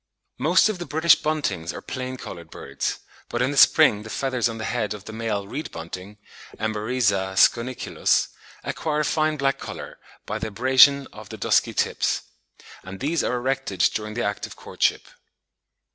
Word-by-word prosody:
Most 160 +10 +4
of 215 -4 -3
the 175 - -6
British 160 +3 +5
Buntings 100 - -1
are - - -7
plain 130 -1 -5
coloured 85 -8 -9
birds; 70 -3 -4 0.3
but 120 - -2
in 130 - +1
the - - -4
spring 140 -6 +6
the 110 - -10
feathers 125 -1 0
on 115 - -6
the 110 - -5
head 110 -4 -2
of 105 - -12
the 110 - -8
male 110 -3 -3
reed 145 +9 -5
bunting 90 +5 -8 0.4
(Emberiza 105 -3 0
schoeniculus) 120 +4 +2 0.3
acquire 150 -1 -1
a - - 0
fine 155 0 +1
black 135 -1 0
colour - - -8 0.3
by - - -3
the - - -3
abrasion 130 +5 +5
of 110 -1 -11
the 110 - -8
dusky - - +2
tips; - - 0 0.6
and 95 +1 -9
these 155 +5 0
are 125 - 0
erected 130 -7 -2
during 105 0 -4
the 120 - -1
act 105 0 -2
of - - -12
courtship. - - -1
120 Hz, 175 wpm, -24 LUFS, 105-140 Hz, 0.6 s, spring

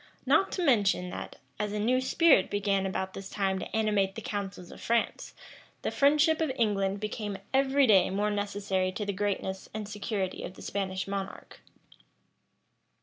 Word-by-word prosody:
Not 315 +9 +3
to 365 - -1
mention 200 - +2
that, - - -7 0.2
as 210 -1 -2
a 210 - -2
new 250 +5 +2
spirit 270 - +4
began 200 -1 0
about 190 0 -3
this 195 0 -7
time 195 -2 0
to - - -6
animate 210 -3 +1
the 225 - -5
councils 195 -3 -5
of - - -12
France, 235 0 -1 0.5
the - - -1
friendship 300 +3 +4
of 315 -4 +1
England 200 -5 +1
became 210 -1 -4 0.2
every 270 +1 +4
day 195 -6 +5
more 205 +2 0
necessary 200 -2 -1
to 210 - -3
the 200 - -2
greatness 190 -1 -2
and 215 -1 -4
security 205 -2 -3
of 185 - -7
the - - -11
Spanish 190 -1 -3
monarch. 195 -1 -6
205 Hz, 165 wpm, -29 LUFS, 195-225 Hz, 0.5 s, day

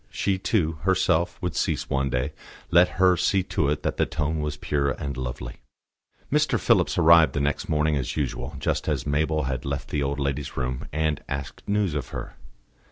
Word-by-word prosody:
She, 95 -2 -1
too, 80 -7 0
herself 90 -1 +1
would 90 -4 -2
cease - - -1
one 70 0 0
day, 65 0 -1 0.4
let 90 +1 +4
her 90 -1 +5
see 95 +2 +2
to 70 - +2
it 75 +1 -1
that - - -1
the - - +2
tone 75 0 -1
was 75 -1 -3
pure 70 -1 0
and 70 +1 -4
lovely. 60 -1 -5 0.7
Mr. - - +2
Phillips - - +2
arrived 80 0 +6
the - - -1
next 70 0 -1
morning 75 0 +2
as 65 0 -3
usual, 70 -5 -3
just - - -1
as 70 -5 -1
Mabel 75 +2 +1
had 65 -1 -2
left 70 -1 -4
the 75 - -1
old 70 +1 -1
lady's 70 0 -3
room, 65 -1 -3
and 80 -1 0
asked 70 -1 -5
news 100 -4 +1
of 75 - -3
her. - - -7
75 Hz, 190 wpm, -25 LUFS, 70-80 Hz, 0.7 s, arrived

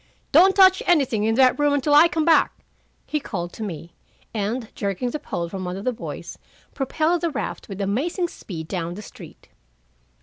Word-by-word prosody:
"Don't 370 +6 +6
touch 375 -1 +6
anything 265 -11 +2
in 225 0 +1
that 260 +2 +4
room 290 0 +3
until 285 +1 +1
I 300 +3 +8
come 320 -2 -1
back," 330 -1 +2 0.4
he 300 - -2
called 175 -10 -5
to - - -10
me, 170 -4 -7 0.4
and 225 +2 -3
jerking 200 +5 -2
the 300 - -4
pole 170 - -4
from 185 +2 -6
one 180 +1 -4
of 195 - -7
the 255 - +1
boys, - - -8 0.3
propelled 315 +5 0
the 340 - 0
raft 285 - -5
with 195 0 -7
amazing 280 - -1
speed 165 - -8
down 175 -1 -4
the 210 - -8
street. - - -13
250 Hz, 190 wpm, -23 LUFS, 195-310 Hz, 0.4 s, I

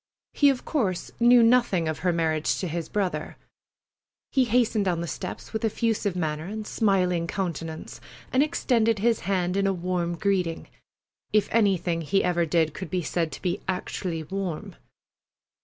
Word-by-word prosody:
He 285 - +5
of 265 -2 -1
course 205 - -1
knew 240 0 +7
nothing 230 -8 +3
of 155 -1 -2
her 180 0 +1
marriage 160 -2 0
with 175 - -2
his 170 0 -4
brother. 195 -3 -2 0.9
He 260 -2 +3
hastened 230 -3 +2
down 175 -3 0
the - - -2
steps - - -6
with 220 - -2
effusive 220 -3 0
manner 155 -3 -2
and 215 +3 -5
smiling 180 -6 +1
countenance, 165 -4 -4 0.3
and 260 - +4
extended 240 -8 +2
his 225 +2 +2
hand 180 -1 -1
in 195 0 +2
a 195 - +2
warm 175 -1 -2
greeting—if 195 +2 -2
anything 190 -6 +2
he 195 +5 +1
ever 175 -2 +1
did 160 -1 +2
could 190 - -6
be 180 -2 -1
said 165 0 -1
to - - -8
be 180 +1 -1
actually 180 -2 -3
warm. 180 - -4
185 Hz, 155 wpm, -26 LUFS, 170-220 Hz, 0.9 s, knew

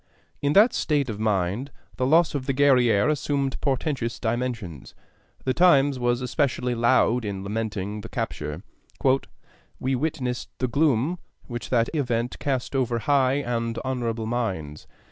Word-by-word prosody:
In 145 +1 +1
that 215 +7 +6
state 145 -5 0
of 105 - -7
mind 105 +4 0 0.3
the 130 - +1
loss 160 +3 +4
of 140 -2 -3
the 135 - 0
Guerrière 125 -4 +4
assumed 140 -2 -1
portentous 135 -3 -1
dimensions. 115 - -3 0.5
The 130 - +2
Times 145 -5 +4
was 120 0 +1
especially 125 -1 0
loud 120 0 +3
in 100 -2 -4
lamenting 105 -1 -3
the 115 - -9
capture: 85 - -4 1.2
"We 130 +1 -1
witnessed 130 -3 -2
the 130 - 0
gloom 145 +4 +1 0.3
which 120 -2 -6
that 120 -2 +2
event 120 -5 -1
cast 135 -1 -2
over 125 -3 +1
high 135 +3 +2
and 115 -1 -2
honorable 120 -4 -2
minds.... 95 -11 -3
125 Hz, 140 wpm, -25 LUFS, 115-140 Hz, 1.2 s, that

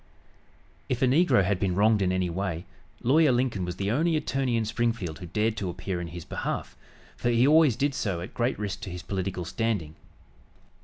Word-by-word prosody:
If 130 0 0
a - - +7
negro 140 - +4
had 95 0 0
been 95 -3 0
wronged 105 +1 +4
in 90 -1 +2
any 95 -1 0
way, 90 0 -3 0.4
Lawyer 145 +4 +5
Lincoln 120 -7 0
was 90 0 -4
the 100 +1 -1
only 160 +7 +2
attorney 135 -5 0
in 115 - 0
Springfield 110 -7 -2
who 90 - -7
dared 105 +5 0
to 95 -4 -2
appear 90 +1 -4
in 85 - -4
his 85 0 -8
behalf, - - -4 0.4
for 120 - -1
he 120 +1 +4
always 155 -5 +5
did 140 +3 0
so 95 -9 -2
at 90 - -7
great 120 +2 0
risk 105 -1 -4
to 105 - -6
his 90 0 -7
political 95 -2 -3
standing. 100 -6 -2
105 Hz, 200 wpm, -27 LUFS, 90-120 Hz, 0.4 s, a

